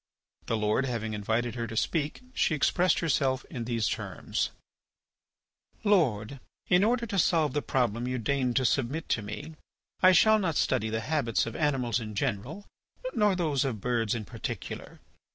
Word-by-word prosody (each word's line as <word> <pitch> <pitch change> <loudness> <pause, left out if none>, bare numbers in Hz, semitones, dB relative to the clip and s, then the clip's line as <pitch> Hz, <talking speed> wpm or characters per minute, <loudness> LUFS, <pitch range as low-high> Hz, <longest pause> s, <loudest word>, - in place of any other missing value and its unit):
The 115 - 0
Lord 105 +5 +1
having 110 -3 -3
invited 110 +3 -1
her 115 -1 -3
to 115 - -6
speak, 150 - -1
she 155 - +2
expressed 180 +4 +2
herself 135 -5 +1
in 120 -2 -4
these 115 -3 0
terms: - - -2 1.3
"Lord, 140 - +2 0.3
in 180 +2 +4
order 235 +2 +2
to 200 -3 -1
solve 155 -5 +3
the 145 - 0
problem 120 -4 0
you 125 0 -1
deign 125 +1 0
to 130 - +2
submit 135 +5 0
to 115 - +1
me 105 +10 -7 0.5
I 185 - +8
shall 215 +4 +6
not 175 -6 -1
study 120 -6 +1
the 110 +1 -2
habits 140 -5 0
of 115 - -6
animals 130 -7 +1
in 110 -2 -7
general 135 - -2 0.5
nor 210 -2 +3
those 155 -7 +1
of 125 -6 -2
birds 115 -1 0
in 110 -2 -4
particular. 85 - -6
130 Hz, 165 wpm, -29 LUFS, 115-160 Hz, 1.3 s, I